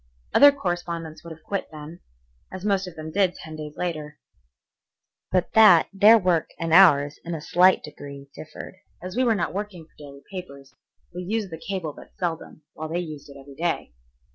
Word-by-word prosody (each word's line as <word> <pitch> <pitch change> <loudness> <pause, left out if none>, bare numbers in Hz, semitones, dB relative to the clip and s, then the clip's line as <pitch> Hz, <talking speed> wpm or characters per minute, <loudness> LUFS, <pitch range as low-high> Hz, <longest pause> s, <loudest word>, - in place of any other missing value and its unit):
Other 285 0 +8
correspondents 175 - -5
would 170 - -10
have 160 -1 -12
quit 200 -1 -3
then, 155 +2 -10 0.5
as 185 +1 -7
most 195 -2 +1
of 180 - -10
them 155 0 -7
did 190 -1 +1
ten 160 0 -10
days 150 -1 -8
later, 155 -4 -4 1.1
but 180 -1 0
that 210 -7 +7
their 210 +3 +7
work 180 -5 +1
and 165 -1 -2
ours 145 -6 +6
in 170 0 -4
a - - -5
slight 180 +5 +3
degree 140 -1 -10
differed. 155 +4 -10 0.2
As 185 +2 -8
we 255 - +2
were 230 -3 +3
not 170 -5 -2
working 195 -4 -6
for - - -33
daily 140 -1 -12
papers, 140 -8 -9 0.4
we 180 - -5
used 205 +1 -3
the 160 - -6
cable 185 -6 -4
but - - -15
seldom, 165 -3 -5
while 155 0 -7
they 165 - -2
used 155 -5 -6
it 140 - -12
every 140 +1 -13
day. 165 - -3
170 Hz, 190 wpm, -24 LUFS, 155-185 Hz, 1.1 s, Other